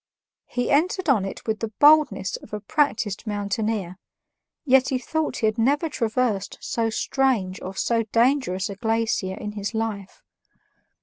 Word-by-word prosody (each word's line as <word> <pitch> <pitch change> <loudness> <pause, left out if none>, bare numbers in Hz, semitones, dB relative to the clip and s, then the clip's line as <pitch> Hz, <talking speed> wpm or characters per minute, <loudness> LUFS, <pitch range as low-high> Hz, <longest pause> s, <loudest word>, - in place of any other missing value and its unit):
He 245 -1 -2
entered 355 +4 +1
on 215 -8 +3
it 195 - -7
with 220 -1 -1
the 225 -1 -4
boldness 290 -11 +5
of 210 - -16
a 210 - -2
practiced 220 -3 -1
mountaineer, 205 -2 -2 0.7
yet 265 -1 +4
he 260 - +1
thought 315 +5 -2
he 225 - 0
had 215 +1 0
never 285 +7 +2
traversed 230 -6 -1
so 230 -1 -1
strange 220 -5 0
or 190 +1 -6
so 230 +3 +1
dangerous 230 -6 +2
a 200 - -6
glacier 220 -3 -1
in 210 - -5
his 205 +1 -5
life. 215 -3 -4
225 Hz, 150 wpm, -24 LUFS, 200-265 Hz, 0.7 s, boldness